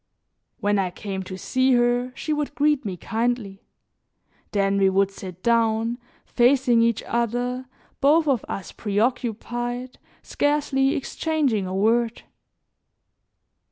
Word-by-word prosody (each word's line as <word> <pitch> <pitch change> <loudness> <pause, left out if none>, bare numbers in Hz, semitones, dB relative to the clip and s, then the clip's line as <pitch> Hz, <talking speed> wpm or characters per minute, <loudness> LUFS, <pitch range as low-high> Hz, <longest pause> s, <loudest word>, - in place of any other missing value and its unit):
When 205 0 +1
I 190 -2 0
came 190 +1 -5
to 185 0 -7
see 260 +6 +1
her, 245 +1 +2
she 310 - -2
would 295 -1 -3
greet 295 -3 +2
me 190 -3 -4
kindly; 225 -2 -2 0.9
then 200 -1 +1
we 195 -1 +4
would 195 +1 +2
sit 185 -2 -10
down 230 0 +1 0.3
facing 245 -1 +3
each 230 -1 +1
other, 245 +2 -2 0.3
both 310 +3 +4
of 265 -5 +2
us 195 - -5
preoccupied, 240 +3 -2 0.2
scarcely 285 -2 +1
exchanging 275 - -1
a 185 - -4
word. 230 +3 +1
235 Hz, 120 wpm, -24 LUFS, 205-260 Hz, 0.9 s, we